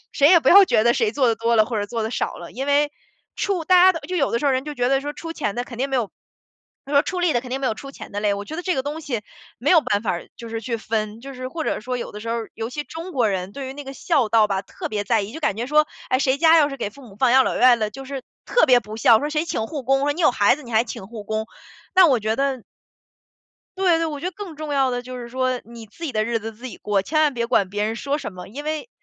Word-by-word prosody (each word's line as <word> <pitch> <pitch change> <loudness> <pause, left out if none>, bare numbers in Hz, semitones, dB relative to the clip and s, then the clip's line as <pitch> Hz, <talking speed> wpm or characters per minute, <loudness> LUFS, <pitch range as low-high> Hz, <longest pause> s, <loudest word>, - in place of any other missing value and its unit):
谁 285 +1 +4
也 340 -2 +7
不 - - +2
要 395 +1 +9
觉 220 -10 +2
得 235 +1 +4
谁 435 - +1
做 260 -4 +2
得 225 - +1
多 230 +1 +1
了， 215 -1 +5
或 225 -2 -3
者 205 - -2
做 230 +1 -3
得 220 - -2
少 - - -2
了。 170 - -9
因 270 +4 -5
为， 290 +1 +3 0.5
出 370 -5 -1
大 365 +1 +6
家 375 - +7
的 330 - -5
就 365 +3 -4
有 275 - +1
的 235 - +1
时 - - -4
候 280 - +4
人 260 +1 0
就 300 -1 -6
觉 245 -1 0
得 270 0 +2
说 290 +1 -5
出 330 +2 -7
钱 210 -10 -3
的 245 - -2
肯 245 -1 -10
定 270 +2 0
没 270 - -3
有 235 -6 0 0.8
他 280 - -7
说 280 +1 +5
出 365 -1 -3
力 350 -2 +2
的 240 - +2
肯 250 - -9
定 265 +2 -2
没 265 - 0
有 220 - 0
出 275 +4 -9
钱 - - -11
的 205 - -4
累， 210 -1 +2
我 200 - -5
觉 315 - -7
得 355 - -4
这 365 -2 0
个 265 - -1
东 295 +3 -4
西 240 -7 -3 0.4
没 255 - -2
有 335 -3 +7
办 205 -6 0
法 205 - 0
儿 175 - -6
就 230 -1 -9
是 225 0 -4
去 235 0 -2
分， 215 0 -3
就 275 +1 -9
是 255 0 -6
或 320 +3 -4
者 - - -1
说 250 +2 -3
有 - - -5
的 210 - -9
时 230 - -7
候 235 - 0
儿 230 -1 -5
尤 225 +2 -5
其 295 +2 -4
中 330 +6 -8
国 240 -5 +2
人， 190 0 -3
对 275 -2 -6
于 265 - -7
那 290 -1 -8
个 270 - -7
孝 275 -5 +1
道 220 -2 +4
吧， 195 0 -1
特 - - -7
别 210 -1 -2
在 220 +1 +2
意。 200 - -6
就 320 - -7
感 205 - +1
觉 235 +2 -3
说， 305 +2 +4 0.2
哎， 255 - +2
谁 270 0 +1
家 330 0 +6
要 290 - +4
是 275 - -6
给 220 - -2
父 275 +5 -16
母 205 -5 -14
放 250 +1 +3
养 265 0 +6
老 - - -1
院 250 -1 +6
了， 215 -1 -1
就 270 +5 -9
是 275 -1 -5 0.2
特 - - +4
别 250 -2 +6
不 215 0 -9
孝， 225 0 +6
说 295 - -2
谁 305 +2 0
请 225 -9 -2
护 290 0 -5
工， 270 +2 +2
说 290 0 +2
你 345 - -3
有 300 - +6
孩 205 +3 +3
子， 300 - -12
你 240 - -10
还 220 +1 +4
请 230 -4 -8
护 225 -1 -8
工， 220 +1 -2 0.5
但 370 -3 +7
我 255 - +3
觉 220 0 -1
得 270 -3 -1 1.1
对 360 -3 +3
对， 330 - 0
我 295 -2 -5
觉 - - -7
得 365 - -1
更 375 -5 -8
重 300 -1 -5
要 270 -2 +3
的 245 -1 -3
就 255 0 -7
是 235 - -8
说 255 0 -1
你 230 0 -11
自 220 +10 -14
己 310 - -2
的 215 -2 0
日 230 0 -1
子 225 +1 -6
自 235 +4 -13
己 245 - -7
过， 200 -2 0
千 310 +8 +1
万 300 -2 +4
别 235 -1 0
管 200 -6 +2
别 205 +1 -2
人 220 +1 -1
说 280 +4 -2
什 220 - -6
么， 180 0 -9
因 275 +8 -8
为， 310 +8 -4
255 Hz, 350 characters per minute, -22 LUFS, 225-295 Hz, 1.1 s, 要